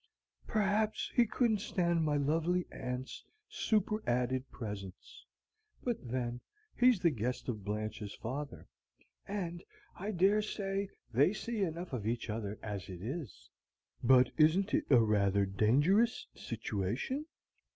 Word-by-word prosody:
"Perhaps 215 0 +1
he 240 -2 +4
couldn't 225 -2 +2
stand 170 -4 +1
my 150 -1 +2
lovely 165 +5 +1
aunt's 125 +1 -5 0.2
superadded 130 - 0
presence. 100 -5 -8 0.6
But 240 -2 0
then, 120 -1 -2 0.3
he's 250 -4 +5
the 170 -2 +3
guest 125 0 -3
of 110 -5 -3
Blanche's 105 0 -4
father, 140 +5 -5 0.6
and 175 -4 -4 0.3
I 200 +3 -5
dare 200 +2 +4
say 200 -2 -2 0.2
they 140 - +4
see 225 +1 -3
enough 170 -3 -2
of 110 -4 -2
each 115 -1 -1
other 105 -1 -4
as 100 -3 -5
it 90 -1 -7
is." 130 - -6 0.5
"But 125 0 +6
isn't 170 +6 +4
it - - +2
a 130 - +7
rather 100 -3 +3
dangerous 145 - +3
situation?" 115 - -3
140 Hz, 125 wpm, -33 LUFS, -, 0.6 s, a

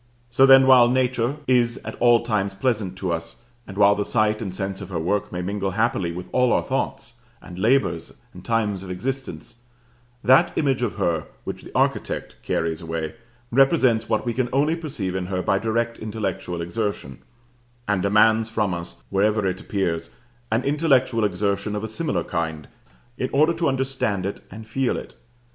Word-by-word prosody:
So 135 +3 +5
then 135 0 +8
while 130 -2 +7
Nature 125 0 +1
is 120 -2 +2
at - - -5
all 120 -1 +5
times 100 -4 -1
pleasant 105 -4 -1
to 95 -2 -2
us, 85 +7 -6 0.2
and 100 - -9
while 100 0 +6
the 105 - -1
sight 110 0 +1
and 100 -4 -3
sense 95 +1 -4
of - - -8
her 90 - -3
work 95 +5 -1
may 90 0 -4
mingle 100 +1 -2
happily 110 -6 +1
with 90 +1 -7
all 125 -1 +3
our - - +2
thoughts, - - -3 0.2
and 90 0 -10
labors, 115 -6 +1 0.2
and - - -12
times 105 -5 0
of 95 - -9
existence, 125 +4 -5 0.7
that 135 +7 +4
image 135 -4 +1
of 120 -4 -1
her 80 -2 -1 0.2
which - - -6
the - - -12
architect - - -1
carries 80 -1 -2
away 80 -1 -4 0.4
represents 130 -4 +3
what 110 - 0
we 120 - -1
can 125 0 -1
only 145 +5 +2
perceive 135 - -4
in 95 -1 -3
her 90 -1 -2
by 95 - +2
direct 115 +2 -1
intellectual 100 -5 -4
exertion, 85 - -4 0.7
and 100 -2 +1
demands 110 +3 +3
from 105 -4 0
us, 85 0 -6
wherever 105 +1 +2
it 95 0 -2
appears, 85 -5 -2 0.4
an 115 +3 +1
intellectual 135 -5 +2
exertion 100 +1 -1
of 105 - -3
a - - -2
similar 150 +9 -2
kind 80 -3 -3 0.5
in 130 - -1
order 155 +4 +3
to 165 -2 0
understand 130 -8 -1
it 100 - -4
and 110 +3 -10
feel 125 +3 -1
it. - - -8
110 Hz, 180 wpm, -23 LUFS, 95-125 Hz, 0.7 s, then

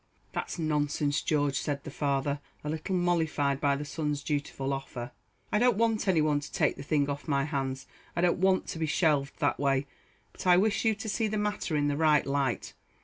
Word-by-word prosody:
"That's - - -4
nonsense, 150 -2 0
George," 145 -3 +1
said 140 -1 -3
the 150 - -7
father, 140 0 0 0.2
a 150 - -2
little 160 +4 -2
mollified 160 -6 +1
by 140 -1 +3
the 145 +2 -4
son's 150 -1 -2
dutiful 140 -2 -2
offer. 125 -2 -5 0.4
"I 210 - +3
don't 245 -3 +4
want 225 -2 +1
any 175 -5 +4
one 150 -1 +2
to 145 - -9
take - - +1
the - - -8
thing 145 0 +1
off 145 +2 -4
my 140 -2 +2
hands. 135 -2 -2 0.3
I 170 - +1
don't 175 0 +2
want 190 0 +3
to 160 - -4
be 160 - 0
shelved 145 -4 +1
that - - +1
way 135 -1 +2 0.5
but - - -7
I 180 -1 +7
wish 210 +4 +2
you 220 -1 +3
to 220 +2 -7
see 220 +1 0
the 215 0 -2
matter 210 -5 -1
in 145 -1 +2
the 145 -1 0
right 155 -2 +4
light. 140 -3 -1
150 Hz, 210 wpm, -29 LUFS, 140-175 Hz, 0.5 s, I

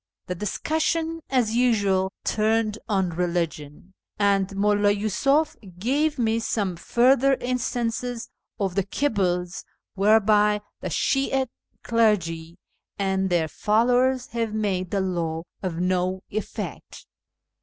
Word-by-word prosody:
The 180 - -4
dicussion, 320 - -1
as 240 -4 +1
usual, 200 -6 +2
turned 220 0 +1
on 190 -4 +1
religion, 170 -1 -3 0.2
and 200 -1 +1
Mulla 205 0 +3
Yi'isuf 245 +9 +1 0.2
gave 290 +9 +1
me 225 -2 +1
some 205 -5 -1
further 260 +8 +3
instances 245 -1 -2 0.3
of 195 -3 -1
the 195 - +2
quibbles 185 -7 -1 0.3
whereby 210 +1 +4 0.2
the 185 - -4
Shi'ite 270 - 0 0.3
clergy 175 -8 +1 0.4
and 190 -1 0
their 170 -3 +2
followers 245 +7 +2
have 230 -2 -2
made 190 -4 -1
the 200 - 0
law 165 -3 -2 0.2
of 175 -3 -3
no 185 +1 0
effect. 215 +1 -6
210 Hz, 110 wpm, -24 LUFS, 185-240 Hz, 0.4 s, whereby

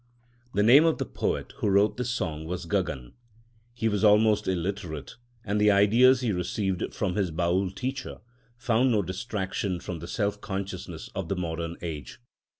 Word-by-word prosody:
The 105 - +3
name 130 +8 +8
of 165 - +2
the - - -2
poet - - -3
who 105 - 0
wrote 100 +2 +3
this 125 -1 -2
song 80 -11 -3
was 90 +1 -4
Gagan. 80 -9 -2 0.6
He 115 - 0
was 105 -1 0
almost 105 0 +4
illiterate; 90 -5 -3 0.3
and 105 +1 0
the 105 - +5
ideas 115 +6 +5
he 120 -4 0
received 95 +1 -2
from 100 -4 -1
his 95 -2 0
Baül 90 +3 0
teacher 130 +1 -4 0.4
found 120 +1 +2
no 105 -3 +2
distraction 95 -1 -3
from 85 -1 -6
the 85 - -8
self 105 +1 -2
consciousness 95 -2 -5
of - - -4
the 100 - 0
modern 85 -1 -4
age. 75 -6 -6
100 Hz, 165 wpm, -27 LUFS, 90-110 Hz, 0.6 s, name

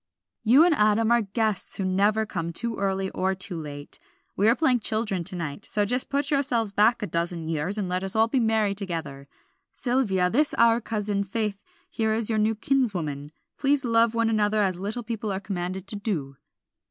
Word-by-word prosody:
"You 265 +9 +6
and 350 - +4
Adam 215 -2 +2
are 235 0 +4
guests 215 0 -1
who 195 - -2
never 205 +4 +2
come 170 -5 -4
too 230 +6 -2
early 195 -1 -1
or 190 +1 -1
too 185 0 -4
late. 145 -1 -8 0.4
We 205 - +2
are 235 - +4
playing 260 -4 +2
children 215 -5 0
to 185 - -4
night, 165 +1 -5
so 205 -1 0
just 250 +5 0
put 280 +1 -1
yourselves 245 -7 0
back 215 +3 +3
a - - +1
dozen 170 -1 -2
years 165 +5 0
and 200 -3 -2
let 180 +1 -2
us 195 +1 -3
all 220 +1 +4
be 255 +3 0
merry 220 -3 +2
together. 165 -8 -6 0.5
Sylvia, 230 -8 +1
this 285 +10 +2
our 230 0 +4
cousin, 210 -3 -2
Faith 205 0 -3 0.3
here 220 -1 0
is 225 0 +1
your 215 - +1
new 220 +1 +2
kinswoman. 185 - -1 0.3
Please 275 -1 +2
love 230 -1 +3
one 230 0 +2
another 210 -1 +2
as 185 -2 -1
little 215 +5 -4
people 220 -2 -4
are 190 - -2
commanded 185 -2 -4
to 205 +1 -2
do." 165 -10 -3
210 Hz, 195 wpm, -25 LUFS, 185-230 Hz, 0.5 s, You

